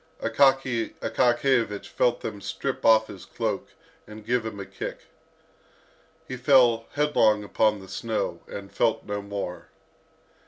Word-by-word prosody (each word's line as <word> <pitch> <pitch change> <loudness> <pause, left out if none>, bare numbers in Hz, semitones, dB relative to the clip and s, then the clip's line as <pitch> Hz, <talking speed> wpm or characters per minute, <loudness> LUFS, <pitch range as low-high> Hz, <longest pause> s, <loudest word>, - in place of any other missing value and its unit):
Akaky 130 -1 +2
Akakiyevich 120 -4 +1
felt 120 -1 +1
them 105 -2 -6
strip - - -4
off 110 -1 +6
his - - -11
cloak, - - -3 0.4
and 105 0 -11
give 120 -1 0
him 105 -2 -7
a 100 - -5
kick. - - -7 1.3
He 130 - -5
fell 125 -4 +4
headlong 115 -8 +3
upon 105 +1 +1
the 95 - -12
snow, 110 +3 -3
and 100 -1 -8
felt - - 0
no 100 0 -3
more. 100 -3 -6
115 Hz, 130 wpm, -26 LUFS, 105-125 Hz, 1.3 s, off